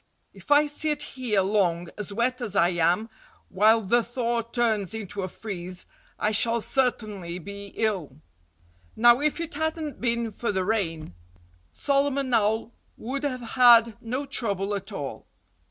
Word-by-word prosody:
"If - - -15
I 290 +1 +6
sit 295 0 0
here 240 -7 -1
long, 180 -4 +1
as 210 -1 -5
wet 250 +4 -1
as 215 -5 -3
I 175 -3 +4
am, 175 +5 +1 0.4
while 215 +4 +4
the 235 +4 +2
thaw 235 0 -1
turns 225 -3 -1
into 205 -2 -5
a 185 - -2
freeze, 185 -2 -7 0.3
I 210 - 0
shall 230 +2 +3
certainly 215 -9 -1
be 200 +3 -8
ill." 180 -11 -2 0.8
Now, 240 +2 +6
if 305 +2 0
it 335 -1 -4
hadn't 315 0 -3
been 235 -1 0
for 230 +2 -2
the 190 -2 -1
rain, 165 - -2 0.6
Solomon 275 - 0
Owl 220 +1 +1 0.3
would 270 +4 -4
have 260 -4 -2
had 235 -3 +6
no 255 +5 -3
trouble 205 -7 -1
at 200 +1 -5
all. 145 -9 -6
225 Hz, 150 wpm, -26 LUFS, 195-250 Hz, 0.8 s, I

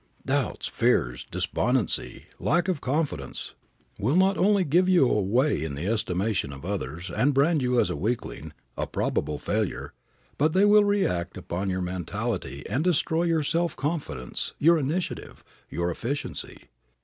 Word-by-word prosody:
Doubts, - - -1
fears, - - +1
despondency, 125 -1 -1
lack 175 +1 +2
of 180 -6 -1
confidence, 150 +3 -2 0.5
will 125 +10 +1
not 190 +2 +4
only 200 0 +3
give 175 +4 +3
you 175 -8 +5
away 120 - +2
in 75 -3 -3
the 75 +5 -4
estimation 100 -5 0
of 70 +3 -9
others 90 -3 -4
and 140 +1 +2
brand 150 +2 +3
you 125 -1 +2
as 90 - +2
a - - -2
weakling, 100 - -3 0.2
a - - -2
probable 75 - -1
failure, - - -2 0.5
but 155 +2 +3
they 195 +2 +5
will 210 0 +7
react 95 - 0
upon 95 +2 -3
your 95 0 -1
mentality 95 - -3
and 145 - 0
destroy 170 -1 +2
your 165 -2 +2
self 170 +1 0
confidence, 145 - -3
your 165 +2 +5
initiative, 155 +6 -3 0.3
your 85 +1 -1
efficiency. 135 +10 -5
130 Hz, 150 wpm, -26 LUFS, -, 0.5 s, will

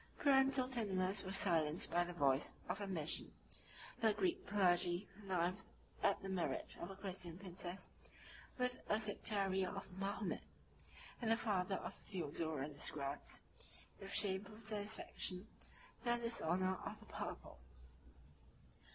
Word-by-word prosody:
Parental 270 -2 +5
tenderness 200 -6 +1
was 190 0 +1
silenced 165 -3 +3
by 175 - +3
the 175 - -5
voice 140 -5 +4
of 185 +4 -2
ambition: 175 -6 0 0.7
the 220 -2 +4
Greek 375 - 0
clergy 180 -1 +3
connived 185 -2 -1 0.4
at - - +3
the - - -4
marriage 190 -3 -2
of 175 - -4
a 195 - -7
Christian 185 -3 0
princess 180 -1 -1 0.7
with 250 0 0
a 215 - +3
sectary 200 -3 +2
of 195 +1 -4
Mahomet; 195 +2 -2 0.8
and 225 - 0
the 225 - +4
father 195 -4 0
of - - -5
Theodora 160 -6 -2
describes, 145 -1 -3 0.6
with 195 0 -8
shameful 200 +2 0
satisfaction, 205 -2 -2 0.6
the 240 -1 +3
dishonor 185 -5 +2
of - - -5
the - - -13
purple. - - -6
190 Hz, 125 wpm, -40 LUFS, 175-210 Hz, 0.8 s, Parental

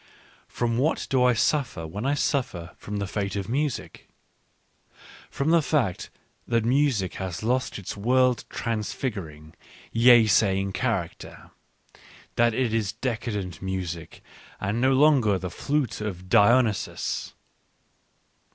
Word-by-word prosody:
— - - -29
From 120 -1 -1
what 155 +5 +1
do 130 -2 +3
I 125 0 +5
suffer 120 - 0
when 105 +10 -4
I 145 - +2
suffer 125 - -1
from 105 0 -5
the 100 - -2
fate 100 0 -3
of 100 -2 -3
music? 140 +3 -3 1.2
From 140 +3 -1
the 170 -1 +5
fact 140 - -1 0.4
that 115 -2 +1
music 125 -7 +1
has 95 0 -4
lost 125 +3 0
its 100 - -6
world 125 +3 +2
transfiguring, 100 - -4 0.4
yea 120 0 +6
saying 95 0 +2
character 105 -9 -4 0.4
— - - -23
that 120 -1 +3
it 125 -3 0
is 110 -3 0
decadent 110 - -4
music 90 -3 -5 0.4
and 105 +5 -2
no 130 +1 +4
longer 130 -8 +4
the 90 -1 -5
flute 140 -2 -2
of 90 -4 -5
Dionysus. 115 0 +2
115 Hz, 130 wpm, -25 LUFS, 95-130 Hz, 1.2 s, yea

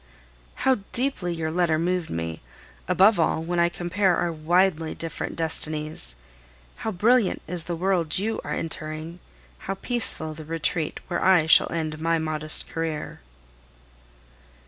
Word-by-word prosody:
How 260 -4 +4
deeply 245 -8 +1
your 160 -1 -2
letter 170 -2 +2
moved 175 +1 -1
me; 80 -1 -4 0.5
above 200 +1 +5
all, 160 0 +1
when 175 +1 -1
I 170 0 +4
compare 175 +1 +1
our 175 - 0
widely 165 +1 +1
different 165 -1 -4
destinies! 155 - -2 0.6
How - - -3
brilliant 220 +2 +2
is 170 0 -5
the 175 - -3
world 175 -3 +1
you 220 +4 -1
are - - -6
entering, 160 +1 -4 0.5
how 195 - 0
peaceful 195 -8 -1
the 155 +1 -9
retreat 160 0 -2
where 175 - -2
I 185 -4 +5
shall 160 - +6
end 155 -2 -3
my 165 +1 +2
modest 155 -1 0
career! 160 - -4
165 Hz, 140 wpm, -25 LUFS, 155-180 Hz, 0.6 s, shall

